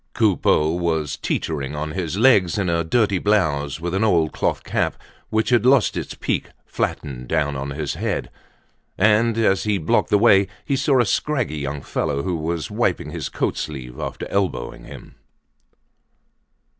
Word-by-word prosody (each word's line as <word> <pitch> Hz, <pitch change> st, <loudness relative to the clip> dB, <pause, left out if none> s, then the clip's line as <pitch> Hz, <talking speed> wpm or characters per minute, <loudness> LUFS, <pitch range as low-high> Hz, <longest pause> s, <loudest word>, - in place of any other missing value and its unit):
Coupeau 90 Hz, -7 st, +3 dB
was 80 Hz, -3 st, -1 dB
teetering 75 Hz, -3 st, -3 dB
on 75 Hz, +1 st, -3 dB
his 90 Hz, +1 st, -3 dB
legs, 105 Hz, -8 st, +4 dB
in 95 Hz, -4 st, 0 dB
a 85 Hz, 0 st, +1 dB
dirty 100 Hz, +2 st, +1 dB
blouse, 75 Hz, -9 st, +1 dB
with 85 Hz, +1 st, -4 dB
an 95 Hz, +3 st, +1 dB
old 85 Hz, -8 st, +3 dB
cloth -, -, -1 dB
cap -, -, -1 dB, 0.3 s
which 110 Hz, 0 st, 0 dB
had 120 Hz, -3 st, +4 dB
lost 130 Hz, -2 st, +4 dB
its -, -, -4 dB
peak -, -, -2 dB, 0.2 s
flattened 65 Hz, -3 st, -3 dB
down 75 Hz, -2 st, 0 dB
on 70 Hz, +1 st, -4 dB
his 70 Hz, +1 st, -3 dB
head. -, -, -3 dB, 0.7 s
And 110 Hz, +3 st, +3 dB
as 105 Hz, -4 st, +2 dB
he 105 Hz, -2 st, +1 dB
blocked 80 Hz, -4 st, +1 dB
the 105 Hz, -, +4 dB
way, 100 Hz, -3 st, +5 dB, 0.2 s
he 140 Hz, -, 0 dB
saw 135 Hz, 0 st, +2 dB
a -, -, +2 dB
scraggy 115 Hz, -, -1 dB
young 70 Hz, 0 st, -4 dB
fellow 70 Hz, 0 st, -2 dB
who 90 Hz, +1 st, -1 dB
was 80 Hz, -2 st, -3 dB
wiping -, -, -1 dB
his -, -, -4 dB
coat -, -, -2 dB
sleeve 65 Hz, -4 st, -6 dB
after -, -, -5 dB
elbowing 95 Hz, -11 st, -2 dB
him. -, -, -12 dB
85 Hz, 165 wpm, -22 LUFS, 75-105 Hz, 0.7 s, way